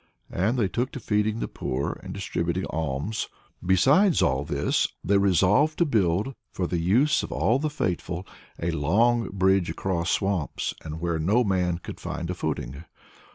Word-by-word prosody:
And 105 +8 0
they 110 -5 +2
took 120 +7 -2
to - - -5
feeding 105 0 0
the - - -1
poor 65 +2 -3
and - - -8
distributing 85 +2 -2
alms. 80 +7 -2 0.4
Besides 135 - +4
all 65 +1 +1
this, 70 -1 0 0.2
they 100 +2 +3
resolved 100 - +3
to 170 - +3
build, 105 - +1 0.2
for 90 - -2
the 85 0 -1
use 120 - +3
of - - -6
all 120 +4 +2
the 155 +1 -1
faithful, 90 - -3 0.3
a 85 +1 -1
long 110 +11 +2
bridge 95 -1 +2
across 85 -3 -2
swamps 95 -6 -1
and 80 0 -6
where 85 -1 -1
no 105 +10 +3
man 90 -4 +1
could 85 - -9
find 85 +1 -4
a - - -1
footing. 75 -4 -4
95 Hz, 165 wpm, -26 LUFS, 85-110 Hz, 0.4 s, Besides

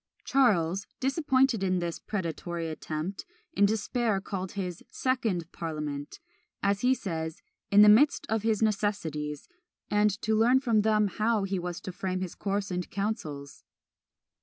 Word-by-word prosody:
Charles, 200 - +2
disappointed 265 - +2
in 185 -1 +1
this 170 -1 -3
predatory 170 -3 -4
attempt, 155 +4 -4 0.3
in 200 -8 +4
despair 220 0 0
called 190 -1 -5
his 180 -4 -4
second 220 -10 -1
parliament 150 -3 -5 0.4
as 200 0 +1
he 255 +1 +4
says, 160 -7 -5 0.3
"in 205 +1 +7
the - - +8
midst 240 +8 +5
of 220 0 0
his 220 0 +1
necessities 165 -9 -1 0.4
and 210 0 +4
to 220 - +1
learn 240 +4 +5
from 230 -5 +2
them 215 0 +3
how 215 +2 +1
he 195 -1 -1
was 175 0 -4
to 185 - -6
frame 185 0 -3
his 185 -2 -4
course 200 0 -2
and 180 0 -3
counsels." 155 -9 -4
200 Hz, 145 wpm, -28 LUFS, 170-220 Hz, 0.4 s, the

